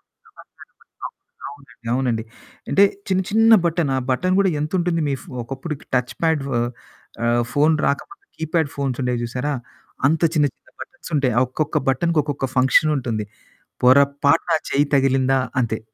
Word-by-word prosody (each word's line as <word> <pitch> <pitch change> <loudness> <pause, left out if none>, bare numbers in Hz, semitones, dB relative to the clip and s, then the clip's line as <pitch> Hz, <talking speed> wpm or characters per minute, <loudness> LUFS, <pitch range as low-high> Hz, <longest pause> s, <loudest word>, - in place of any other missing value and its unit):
అంత - - -39
వల్నెరబుల్‌గా. - - -14
ఉంటుంది. - - -58
అవునండి. 140 -2 -16 0.2
అవునండి. 120 -4 0 0.5
అంటే, 200 - +5 0.2
చిన్న 190 0 +1
చిన్న 225 +1 +5
బటన్, 165 -4 0
ఆ - - +1
బటన్ 185 +9 +1
గూడా 195 -1 +3
ఎంతుంటుంది, 170 +1 0
మీ 140 - 0
ఫొ - - -14
ఒకప్పుడుకి 135 +4 -7
టచ్ 125 0 -1
పాడ్ 160 -3 +2
వ - - -4 0.7
ఆహ్, 120 0 +2
ఫోను 150 +2 +3
రాకపోతే 400 - -3
కీప్యాడ్ 160 -1 -1
ఫోన్సుండేయి 125 -3 -2
జూశారా? 125 +5 -2 0.5
అంత 160 +2 +2
చిన్న 145 -2 +3
చిన్న - - -27
బటన్సుంటాయి. 145 - -2
ఆ - - +4
ఒక్కొక్క 150 +3 -1
బటన్‌కి, 160 +5 +1
ఒక్కొక్క 145 -2 -4
ఫంక్షనుంటుంది. 130 -4 +2 0.6
పొరపాటున 140 +5 +4 0.2
చెయ్యి 145 +1 +2
తగిలిందా 135 0 +2 0.2
అంతే. 115 -2 -1
140 Hz, 145 wpm, -21 LUFS, 130-160 Hz, 0.7 s, అంటే